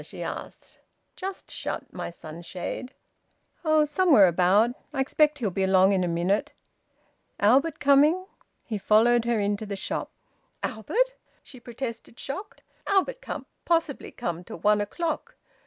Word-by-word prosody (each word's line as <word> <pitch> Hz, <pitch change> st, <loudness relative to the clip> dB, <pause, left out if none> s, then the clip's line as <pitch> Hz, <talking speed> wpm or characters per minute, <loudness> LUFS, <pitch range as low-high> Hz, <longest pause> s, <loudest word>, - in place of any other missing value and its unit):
she -, -, -8 dB
asked. -, -, -8 dB, 0.4 s
"Just 380 Hz, 0 st, -6 dB
shut -, -, -5 dB
my -, -, -4 dB
sunshade." 175 Hz, -, -7 dB, 0.7 s
"Oh! 310 Hz, -2 st, +4 dB
Somewhere 300 Hz, -, +5 dB
about. 185 Hz, +7 st, +4 dB, 0.2 s
I 285 Hz, -, -4 dB
expect 300 Hz, +2 st, +2 dB
he'll 220 Hz, -8 st, -1 dB
be 195 Hz, -, -2 dB
along 190 Hz, 0 st, +5 dB
in 190 Hz, -2 st, +2 dB
a -, -, 0 dB
minute. 175 Hz, +4 st, 0 dB, 0.9 s
Albert 270 Hz, +9 st, +3 dB
coming?" 295 Hz, +6 st, +4 dB, 0.4 s
He 215 Hz, -3 st, -4 dB
followed 230 Hz, +4 st, +4 dB
her 235 Hz, -2 st, +1 dB
into 205 Hz, +1 st, -1 dB
the 200 Hz, -, -3 dB
shop. 195 Hz, -, -3 dB, 0.5 s
"Albert!" 465 Hz, -, 0 dB, 0.3 s
she 255 Hz, -, -13 dB
protested, 235 Hz, -1 st, -7 dB
shocked. 390 Hz, +11 st, -7 dB, 0.2 s
"Albert 400 Hz, +6 st, +1 dB
can't -, -, -6 dB, 0.2 s
possibly 330 Hz, -4 st, 0 dB
come 175 Hz, -7 st, -4 dB
till -, -, -9 dB
one 210 Hz, +4 st, +3 dB
o'clock. 320 Hz, +11 st, -3 dB
235 Hz, 140 wpm, -26 LUFS, 195-300 Hz, 0.9 s, Somewhere